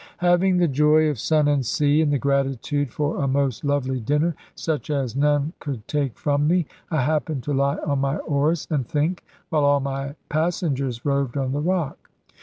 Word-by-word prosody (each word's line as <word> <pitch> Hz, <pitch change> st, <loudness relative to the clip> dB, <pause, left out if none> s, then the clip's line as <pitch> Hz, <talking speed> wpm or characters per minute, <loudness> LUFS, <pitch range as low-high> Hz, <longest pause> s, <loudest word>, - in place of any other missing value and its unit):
Having 180 Hz, +1 st, +3 dB
the 175 Hz, -1 st, +3 dB
joy 150 Hz, +2 st, +4 dB
of 145 Hz, -6 st, -3 dB
sun 155 Hz, +4 st, +2 dB
and 145 Hz, -2 st, +2 dB
sea, 145 Hz, +5 st, +2 dB
and 150 Hz, -2 st, +2 dB
the 145 Hz, -, +2 dB
gratitude 140 Hz, 0 st, 0 dB
for 150 Hz, +1 st, -1 dB
a -, -, +1 dB
most 135 Hz, -3 st, 0 dB
lovely 135 Hz, -2 st, 0 dB
dinner, 150 Hz, +8 st, 0 dB, 0.2 s
such 160 Hz, -1 st, -3 dB
as 135 Hz, -5 st, -1 dB
none 145 Hz, +2 st, +1 dB
could 130 Hz, -7 st, -6 dB
take 140 Hz, -5 st, -1 dB
from 145 Hz, 0 st, +1 dB
me, 175 Hz, 0 st, +2 dB, 0.2 s
I 155 Hz, -6 st, +1 dB
happened 150 Hz, -2 st, -1 dB
to 145 Hz, -, -2 dB
lie 140 Hz, +2 st, +1 dB
on 140 Hz, -2 st, 0 dB
my 135 Hz, +2 st, 0 dB
oars 150 Hz, +2 st, 0 dB
and 135 Hz, -6 st, 0 dB
think, 155 Hz, +5 st, -1 dB, 0.3 s
while 155 Hz, -3 st, +1 dB
all 145 Hz, 0 st, +4 dB
my 135 Hz, +1 st, -4 dB
passengers 145 Hz, -6 st, -1 dB
roved 140 Hz, -2 st, 0 dB
on 135 Hz, -1 st, -1 dB
the 145 Hz, +2 st, -1 dB
rock. 175 Hz, -2 st, -2 dB
145 Hz, 190 wpm, -23 LUFS, 135-155 Hz, 0.3 s, joy